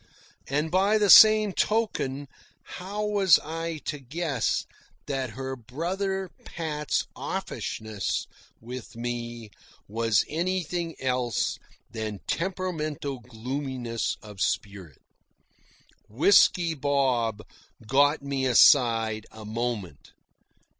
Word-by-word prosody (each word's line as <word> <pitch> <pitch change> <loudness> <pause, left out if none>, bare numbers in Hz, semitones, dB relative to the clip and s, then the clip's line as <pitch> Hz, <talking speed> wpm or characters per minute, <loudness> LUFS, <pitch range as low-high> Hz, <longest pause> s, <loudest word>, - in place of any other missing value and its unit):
And 150 +3 -1
by 195 +4 +3
the 205 -3 +4
same 215 +1 +8
token, 145 -13 -1 0.4
how 205 +4 -5
was 200 -5 +5
I 165 +1 -5
to 150 - -3
guess 140 -1 -1 0.4
that 135 -2 -2
her 130 +3 -5
brother 180 - -3
Pat's 150 -3 -2
offishness 110 -2 -3 0.3
with 125 +1 -9
me 120 -2 -5 0.4
was 115 -1 +1
anything 175 0 -2
else 125 -3 -1 0.3
than 110 -3 -5
temperamental 155 -7 -3
gloominess 125 0 -4
of 105 -2 -10
spirit? 95 -8 -3 1.1
Whisky 165 - +4
Bob 130 -7 0 0.4
got 140 +5 +3
me 135 -1 -1
aside 115 -4 +4
a 110 -1 -11
moment. 110 - -4
135 Hz, 90 wpm, -26 LUFS, 115-170 Hz, 1.1 s, same